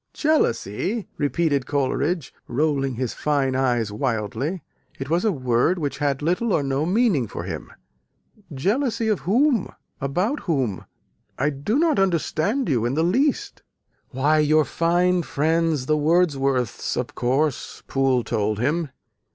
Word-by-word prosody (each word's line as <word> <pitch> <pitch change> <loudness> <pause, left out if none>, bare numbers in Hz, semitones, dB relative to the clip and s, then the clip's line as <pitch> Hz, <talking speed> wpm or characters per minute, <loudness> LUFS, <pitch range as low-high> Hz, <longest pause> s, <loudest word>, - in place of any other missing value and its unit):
"Jealousy!" 205 - 0
repeated 145 -2 0
Coleridge, 145 +3 -1
rolling 135 0 0
his 125 0 -2
fine 140 -3 0
eyes 120 -5 +1
wildly. 120 - -2 0.3
It 135 +2 -6
was 170 +2 +2
a 220 - +3
word 130 +3 +1
which 145 -4 -3
had 145 -1 0
little 180 +7 +1
or 145 - +2
no 135 +3 -1
meaning 190 - +2
for 85 - -6
him. 85 -4 -6 0.8
"Jealousy 220 - 0
of 210 - +1
whom? 250 0 +2 0.3
about 180 - 0
whom? 130 - -2 0.5
I 145 +3 +1
do 145 - -1
not 320 -4 +2
understand 195 - 0
you 125 -7 +1
in 120 +3 0
the 160 - +2
least." 285 - 0 0.5
"Why, 150 +3 +2
your 155 0 +4
fine 175 +5 +2
friends 160 -2 0
the 155 - +2
Wordsworths, 140 - +1
of 125 0 -3
course," 135 +3 -1
Poole 135 -2 +1
told 110 -2 -1
him. 150 +7 0
150 Hz, 135 wpm, -23 LUFS, 130-180 Hz, 0.8 s, your